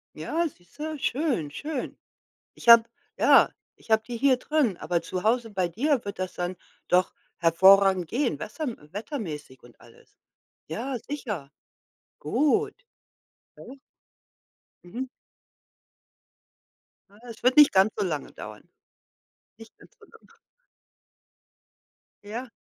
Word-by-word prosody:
Ja, 335 +1 -1
siehste? 295 - -8
Schön, 250 - -1
schön. 290 - -5 0.6
Ich - - -10
habe 230 -1 +10 0.3
ja, - - +5 0.3
ich - - -20
habe 220 0 +4
die 245 - -5
hier 270 0 +4
drin, 255 - 0
aber 170 0 -1
zu 185 +1 -5
Hause 230 +1 +1
bei 185 -4 -1
dir 255 - 0
wird 200 -2 -6
das 185 0 -4
dann 180 +1 -3 0.3
doch 180 +1 +2 0.2
hervorragend 190 +1 +5
gehen, 255 - -1
wesser 270 +9 -5 0.3
wettermäßig 180 - -6
und 120 - -19
alles. - - -21 0.5
Ja, 250 - -4
sicher. 210 - -6 0.7
Gut, 300 - +1 0.8
ne? 275 - -12 1.1
Mhm. 240 +9 -6 2.1
Ah, 210 - -19
es 225 - -11
wird 255 +3 +3
nicht 295 -1 +8
ganz 195 +3 +4
so - - 0
lange 155 -5 -4
dauern. - - -10 0.9
Nicht 225 0 -15
ganz - - -20
so - - -17
lange. 460 0 -22 1.9
Ja. 235 +5 -6
225 Hz, 120 wpm, -26 LUFS, 180-270 Hz, 2.1 s, habe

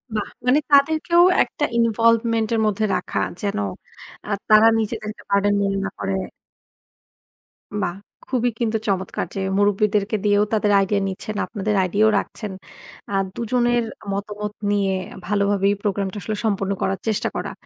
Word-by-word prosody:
বাহ! 210 - -2 0.2
মানে 260 +4 +5
তাদেরকেও 315 +4 +4 0.2
একটা - - -6
ইনভলভমেন্ট 230 0 +2
এর 225 - +2
মধ্যে 215 +1 +1
রাখা। - - -2 0.2
যেন 200 -1 -2 0.7
আ 210 - -4 0.2
তারা 215 +1 +7
নিজেদেরকে 215 -1 -4
বার্ডেন 200 +1 +3
মনে 195 0 0
না - - -2
করে। 195 0 -2 1.7
বাহ! 175 - -1 0.4
খুবই 245 -1 +2
কিন্তু 225 -2 +1
চমৎকার 190 -2 -1
যে, - - -2 0.2
মুরুব্বিদেরকে 205 +1 +2
দিয়েও 205 0 +4
তাদের 210 -1 +2
আইডিয়া 200 +1 +1
নিচ্ছেন, 195 +2 -5
আপনাদের 210 -1 -2
আইডিয়াও 205 +4 +3
রাখছেন। 210 -3 -6 0.6
আ - - -3 0.2
দুজনের 240 +1 +1 0.3
মতামত 210 +1 -4 0.2
নিয়ে 200 -2 +1 0.3
ভালোভাবে 200 0 +1
এই - - 0
প্রোগ্রাম 200 -1 -1
টা - - -6
আসলে 215 - -3
সম্পন্ন 200 -2 0
করার 195 0 0
চেষ্টা 215 -2 0
করা। - - -3
210 Hz, 145 wpm, -22 LUFS, 200-225 Hz, 1.7 s, তারা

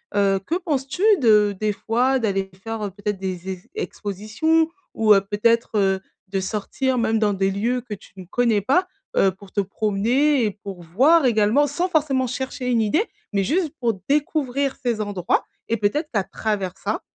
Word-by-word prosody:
heu, 195 -1 +3
que 330 - -1
penses-tu 295 -3 -2 0.2
de 210 -5 +4
des 215 -1 0
fois 250 +6 +1
d'aller 195 -4 -1
faire, 225 -1 -4
heu, 205 - -2
peut-être 205 0 -3
des 190 0 -4
e - - -15 0.2
expositions 315 - 0 0.2
ou 215 -1 +5
heu, 195 - +5
peut-être, 215 +4 +1
heu, 195 -1 +2 0.3
de 195 - -1
sortir 220 +6 -2
même 225 -1 +1
dans 210 -2 +2
des 195 0 +1
lieux 235 +6 -1
que 225 -3 -7
tu 200 - -11
ne 185 - -9
connais 225 +1 +1
pas? 360 - +2 0.3
Heu, 195 - +4
pour 190 +1 -16
te 200 - +1
promener 225 +8 +1
et 210 - 0
pour 195 -3 -9
voir 270 - +4
également 225 +4 +3
sans 350 +6 -1
forcément 285 -6 +1
chercher 260 0 -4
une 235 -2 +2
idée, 310 - +2 0.3
mais 200 -1 +2
juste 315 - 0
pour 230 -6 0
découvrir 280 -2 0
ces 235 -3 0
endroits 200 -4 0 0.2
et 230 - 0
peut-être 255 +10 0
qu'à 200 -4 +2
travers 195 -4 -3
ça, 205 +2 -3
220 Hz, 180 wpm, -22 LUFS, 200-265 Hz, 0.3 s, ou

